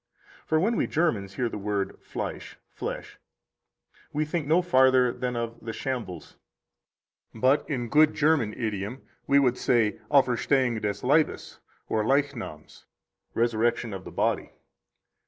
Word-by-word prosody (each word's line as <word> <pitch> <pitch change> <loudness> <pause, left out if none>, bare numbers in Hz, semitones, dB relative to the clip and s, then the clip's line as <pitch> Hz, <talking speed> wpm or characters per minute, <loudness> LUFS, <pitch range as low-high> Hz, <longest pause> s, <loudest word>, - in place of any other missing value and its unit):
For 160 - +2
when 220 +6 +1
we - - +1
Germans 105 - 0
hear 125 - 0
the 110 - -5
word 100 -1 -2
Fleisch - - -6
(flesh), - - -6 0.9
we 155 +1 0
think 150 -1 -3
no 170 +4 +4
farther 130 -6 +4
than 125 -1 -3
of 115 0 -4
the 115 0 -6
shambles. 120 -10 -5 1.0
But 130 +6 +2
in 125 -5 -2
good 155 +5 +4
German 145 -8 +2
idiom 110 +2 -4 0.2
we 140 - +4
would 125 -3 +3
say 115 -4 +2
Auferstehung 130 -3 +2
des 100 +1 -3
Leibes, 150 +4 +1 0.3
or 110 - 0
Leichnams 135 - -2 0.5
(resurrection 115 -1 +1
of 95 -1 -6
the - - -9
body). - - 0
125 Hz, 135 wpm, -27 LUFS, 110-145 Hz, 1.0 s, no